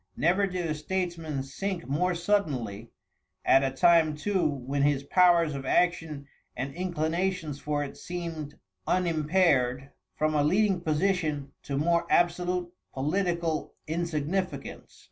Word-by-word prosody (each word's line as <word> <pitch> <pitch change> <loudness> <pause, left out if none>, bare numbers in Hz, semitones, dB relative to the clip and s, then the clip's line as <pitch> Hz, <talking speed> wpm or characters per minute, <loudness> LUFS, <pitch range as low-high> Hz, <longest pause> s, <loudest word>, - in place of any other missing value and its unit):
Never 185 +5 +3
did 180 -2 -3
a 155 - -1
statesman 165 -3 -3
sink 175 +6 -4
more 175 +6 +1
suddenly, 140 - -1 0.6
at 135 - +6
a 135 - +2
time 155 +3 +4
too 190 +4 0
when 140 0 -3
his 140 -1 +2
powers 170 0 +4
of 135 -1 -5
action 160 -1 0 0.3
and 135 +2 -3
inclinations 170 -2 -2
for 145 0 -1
it 140 - -7
seemed 165 -4 -6 0.3
unimpaired 155 -7 +2 0.2
from 155 0 +1
a 150 -1 +2
leading 190 +3 +2
position 155 -4 0
to 140 -1 -4
more 170 +3 +2
absolute 175 0 +1 0.2
political 170 +2 -1
insignificance. 165 -1 -3
160 Hz, 125 wpm, -28 LUFS, 145-180 Hz, 0.6 s, at